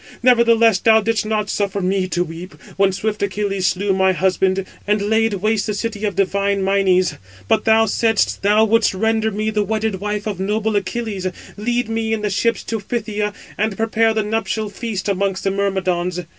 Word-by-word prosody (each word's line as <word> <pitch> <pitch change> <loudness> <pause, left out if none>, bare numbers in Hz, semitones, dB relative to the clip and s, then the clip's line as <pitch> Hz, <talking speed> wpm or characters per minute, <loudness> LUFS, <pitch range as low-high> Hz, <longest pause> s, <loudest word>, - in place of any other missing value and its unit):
Nevertheless, 230 -4 +5
thou 220 +1 +5
didst 220 0 -1
not 215 -1 -1
suffer 200 -1 -1
me 190 0 0
to 175 -1 0
weep, 170 +2 -9 0.2
when 195 0 +3
swift 210 +3 -3
Achilles 195 -1 -1
slew 195 +1 0
my 190 0 +3
husband, 190 +2 +1 0.2
and 210 +1 +2
laid 220 +1 +1
waste 215 +2 0
the 210 - -2
city 215 -1 -3
of 205 - -2
divine 200 0 0
Mynes, 190 -2 +2 0.3
but - - +1
thou 225 0 +5
saidst 225 0 +1
thou 210 +2 +4
wouldst 225 -2 +2
render 220 +2 +1
me 215 +1 -2
the 210 -1 0
wedded 215 -1 -1
wife 210 +1 -3
637 215 - -2
of 195 - -3
noble 215 0 0
Achilles, 200 -1 -2 0.3
lead 240 +3 -1
me 225 0 -1
in 215 -1 -2
the 210 - -1
ships 230 +4 0
to 225 0 -3
Phthia, 210 -1 -3 0.3
and 215 -1 0
prepare 225 0 +1
the 220 - +1
nuptial 220 0 -2
feast 205 -3 -4
amongst 195 -1 -1
the 195 - +1
Myrmidons. 185 -3 -1
210 Hz, 185 wpm, -19 LUFS, 195-220 Hz, 0.3 s, Nevertheless